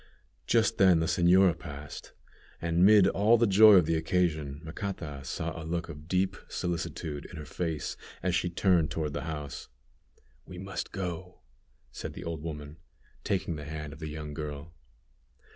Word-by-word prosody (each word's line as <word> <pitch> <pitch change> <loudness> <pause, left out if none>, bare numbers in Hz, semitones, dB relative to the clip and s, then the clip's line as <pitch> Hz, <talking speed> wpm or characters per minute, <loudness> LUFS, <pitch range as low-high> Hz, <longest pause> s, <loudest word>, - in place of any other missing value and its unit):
Just 115 -3 +2
then 95 -4 +6
the 80 - +1
señora 90 +2 +4
passed, 75 -3 -9 0.5
and, 85 +1 +1
mid 100 -1 +7
all 105 +4 +4
the 120 - +4
joy 105 +1 +8
of 90 -4 +6
the 80 +1 +1
occasion, 80 -4 0
Macata 80 -4 -5
saw 80 +5 -4
a 80 - -6
look 85 +1 -3
of 75 -1 -9
deep 95 +1 +1
solicitude 85 -4 -3
in 85 - -10
her 75 - -7
face 80 -1 -3 0.3
as 90 0 +1
she 90 - +1
turned 85 -2 +2
toward 75 -3 -2
the 80 - -4
house. 75 -3 -6 0.8
"We 90 - -11
must 95 +2 -5
go," 90 -2 -5 0.5
said - - -6
the - - -8
old 80 -2 -4
woman, 75 -1 -7 0.5
taking 90 -4 -1
the 75 - -7
hand 75 -1 -6
of - - -12
the 80 -1 -5
young 75 -1 -6
girl. 75 +1 -6
85 Hz, 165 wpm, -29 LUFS, 75-90 Hz, 0.8 s, joy